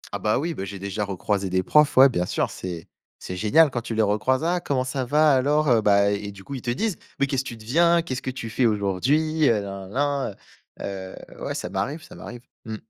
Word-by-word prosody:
Ah, - - -3
bah, 105 +2 +1
oui, 165 +4 -2
bah 95 - -5
j'ai 100 +1 -6
déjà 100 +2 -3
recroisé 100 0 -2
des 95 0 +1
profs, 150 +7 +3
ouais, 135 +1 +10
bien 90 -9 -1
sûr, - - -1
c'est 85 -3 -7 0.3
c'est 90 - -7
génial 135 - +4
quand 120 -2 -2
tu 115 -1 -5
les 110 - +3
recroises. 120 +7 +1
«Ah 175 +2 +1
comment 140 -6 -1
ça 130 0 -3
va? 150 +3 +4
Alors?» 145 +3 +2
heu 115 -2 +4
bah 100 -1 +4
et 100 0 -3
du 95 -1 -13
coup, 140 - -8
ils 130 - -5
te 120 - -4
disent: 185 - -1 0.2
«Mais 140 - +3
qu'est-ce 135 -1 -1
tu 120 - -6
deviens? 170 +10 +3
Qu'est-ce 130 -5 -4
que - - -4
tu 125 -3 -6
fais 125 - +1
aujourd'hui? 135 - +1
Heu, 110 -3 +2
na 100 -1 -7
na 140 -1 -1 0.4
na, - - -6
heu», 95 -1 -6 0.2
heu, - - -11
ouais, - - -3
ça - - -4
m'arrive, 150 +4 -3
ça - - -13
m'arrive. 120 0 -9 0.2
Mmh. 110 - -5
120 Hz, 245 wpm, -24 LUFS, 100-145 Hz, 0.4 s, ouais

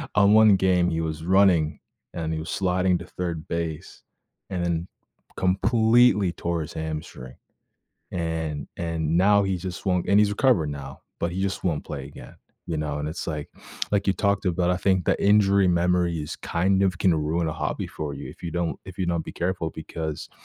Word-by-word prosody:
on 100 0 +5
1 110 -2 +7
game, 90 -1 +3
he 80 - -1
was 80 -1 -4
running, 90 -4 +3 0.3
and 80 -1 -3
he 80 - -2
was 80 0 -6
sliding 90 -1 +1
to - - -8
third 85 -3 -4
base 85 -2 -4 0.5
and 90 -2 -2
then 85 0 -1 0.5
completely 110 +1 +3
tore 85 0 -2
his 75 - -6
hamstring. 80 -5 -6 0.8
And 80 -4 -3
and 85 -1 -1
now 100 +2 +5
he 95 -1 0
just 90 0 -7
won't 90 -2 +1
and 100 - +4
he's 105 -1 +5
recovered 105 - +2
now, 70 -1 -8 0.2
but 85 - 0
he 95 +2 -3
just 95 0 -2
won't 80 -5 0
play 70 -3 -6
again, 70 -3 -12 0.3
you 80 - -3
know, 75 -1 -2
and 75 +1 -3
it's 80 - -6
like 75 -2 -4 0.4
like 100 -1 +1
you 95 - +4
talked 100 0 0
about, 90 0 +1
I 90 - 0
think 95 0 +1
the - - +1
injury 100 -1 +4
memories 85 -3 +1
kind 95 +3 +1
of 95 -3 +1
can 90 - +4
ruin 80 +2 0
a - - -3
hobby - - -3
for 75 -2 -5
you 70 - -7
if - - -14
you 85 - -3
don't 85 -1 -2
if 95 -2 -10
you 95 - -1
don't 85 -2 -1
be - - -7
careful 90 -2 -2
because, 80 -1 -6
85 Hz, 195 wpm, -25 LUFS, 80-95 Hz, 0.8 s, 1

